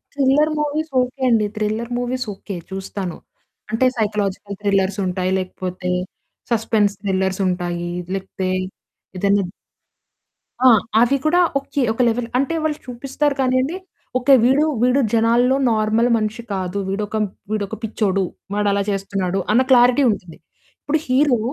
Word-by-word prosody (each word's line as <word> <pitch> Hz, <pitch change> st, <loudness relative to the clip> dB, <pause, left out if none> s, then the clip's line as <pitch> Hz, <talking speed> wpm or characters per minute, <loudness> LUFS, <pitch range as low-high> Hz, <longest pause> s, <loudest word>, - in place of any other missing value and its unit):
Thriller 285 Hz, +3 st, +3 dB
movies 300 Hz, +1 st, -2 dB
okay. 250 Hz, +2 st, -4 dB
అండి. 220 Hz, -3 st, +3 dB
Thriller 215 Hz, +3 st, -2 dB
movies 250 Hz, +1 st, -2 dB
okay. 195 Hz, 0 st, -8 dB, 0.2 s
చూస్తాను. 190 Hz, -2 st, -5 dB, 0.5 s
అంటే 230 Hz, +4 st, +2 dB
సైకలాజికల్ 205 Hz, -2 st, -2 dB
థ్రిల్లర్సుంటాయి. 190 Hz, -2 st, 0 dB
లేకపోతే 185 Hz, 0 st, -5 dB, 0.6 s
సస్పెన్స్ 215 Hz, -2 st, +2 dB
థ్రిల్లర్సుంటాయి. 185 Hz, -3 st, -1 dB, 0.2 s
లేకపోతే 190 Hz, -1 st, -3 dB, 0.7 s
ఏదైనా 200 Hz, +1 st, +2 dB, 1.2 s
ఆ! -, -, +9 dB, 0.3 s
అవి 250 Hz, +4 st, +4 dB
గూడా 350 Hz, +3 st, +3 dB, 0.2 s
ఓకే. 280 Hz, 0 st, -3 dB
ఒక 230 Hz, -, -16 dB
లెవెల్ 230 Hz, 0 st, 0 dB
అంటే 275 Hz, +4 st, 0 dB
వాళ్ళు 305 Hz, -1 st, 0 dB
చూపిస్తారు 270 Hz, +3 st, -2 dB
కానీయండి 260 Hz, +6 st, +1 dB, 0.4 s
ఓకే. 270 Hz, +2 st, +4 dB
వీడు, 270 Hz, +4 st, +4 dB, 0.2 s
వీడు 250 Hz, +3 st, +3 dB
జనాల్లో 235 Hz, +3 st, +3 dB, 0.2 s
నార్మల్ 220 Hz, +2 st, +2 dB
మనిషి 220 Hz, +2 st, -3 dB
కాదు 185 Hz, 0 st, -3 dB
వీడొక, 210 Hz, +2 st, -2 dB, 0.3 s
వీడొక 205 Hz, -2 st, -2 dB
పిచ్చోడు. 195 Hz, -3 st, 0 dB, 0.3 s
వాడలా 205 Hz, -1 st, +1 dB
చేస్తున్నాడు. 195 Hz, -1 st, -1 dB
అన్న 240 Hz, +4 st, +5 dB
క్లారిటీ 250 Hz, +2 st, +6 dB
ఉంటుంది. 180 Hz, -5 st, -7 dB, 0.4 s
ఇప్పుడు 310 Hz, +2 st, 0 dB
హీరో 255 Hz, -2 st, +3 dB
220 Hz, 120 wpm, -20 LUFS, 195-255 Hz, 1.2 s, ఆ